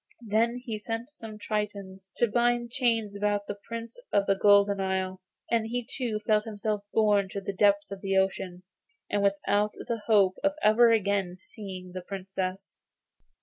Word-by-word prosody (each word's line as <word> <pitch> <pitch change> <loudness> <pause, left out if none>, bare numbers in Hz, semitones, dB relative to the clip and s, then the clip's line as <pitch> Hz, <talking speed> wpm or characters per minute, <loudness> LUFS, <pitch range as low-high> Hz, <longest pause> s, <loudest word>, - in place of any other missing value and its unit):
Then 225 +3 +2
he 220 -4 -4
sent 225 +5 -4
some 225 -7 -9
tritons 200 -3 -4
to 240 - +3
bind 240 +1 +1
chains 230 -6 0
about 205 0 0
the 205 - -4
Prince 230 0 -6
of 200 -1 +3
the 195 - +3
Golden 200 0 +4
Isle, 190 -1 -2 0.3
and 225 -1 +2
he 245 +1 -3
too 235 -5 -3
felt 215 -1 +3
himself 210 -1 -3
borne 205 -3 +3
to 200 - -4
the 200 0 -4
depths 200 +1 +3
of 195 -1 -6
the 195 -1 0
ocean, 190 -1 -1 0.5
and 205 - +1
without 205 +1 +1
the 230 -2 -4
hope 200 -4 +4
of 295 0 +3
ever 230 +2 +6
again 200 -4 +1
seeing 185 -2 -9
the 185 0 -6
Princess. 190 0 -5
205 Hz, 165 wpm, -28 LUFS, 195-225 Hz, 0.5 s, ever